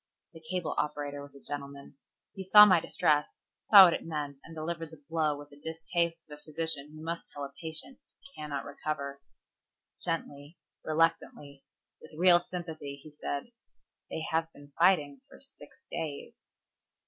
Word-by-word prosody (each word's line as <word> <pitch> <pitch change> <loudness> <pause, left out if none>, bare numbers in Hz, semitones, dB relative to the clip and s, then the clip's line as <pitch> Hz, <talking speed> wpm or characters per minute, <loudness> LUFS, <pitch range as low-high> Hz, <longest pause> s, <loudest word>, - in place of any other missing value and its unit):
The 165 - -11
cable 175 +1 -3
operator 145 -1 -3
was 140 0 -12
a - - -12
gentleman. 140 0 -7 0.4
He 195 - -6
saw 210 +3 +10
my 185 -4 +5
distress, 150 -2 +1 0.4
saw 200 -3 +12
what 170 - +4
it - - -3
meant 150 -3 -4
and 165 - -12
delivered 165 0 -4
the 155 -2 -15
blow 155 -3 0
with 145 0 -12
the 145 - -16
distaste 165 +1 -2
of 150 -1 -11
a - - -22
physician 155 -2 -3
who 155 - -10
must 170 +1 -4
tell 145 - -7
a 140 0 -7
patient 160 - -7 0.2
he 275 - -17
cannot 150 -2 -5
recover. 140 -1 -5 0.8
Gently, 160 -2 -4 0.3
reluctantly, 155 -3 -1 0.4
with 155 - -14
real 175 -1 +7
sympathy 165 -5 -6
he 145 +2 -14
said, 145 +7 -5 0.6
"They - - -4
have 165 0 0
been 145 0 -16
fighting 150 -7 +3
for - - -15
six - - -15
days." 150 -3 -5
155 Hz, 160 wpm, -30 LUFS, 145-165 Hz, 0.8 s, saw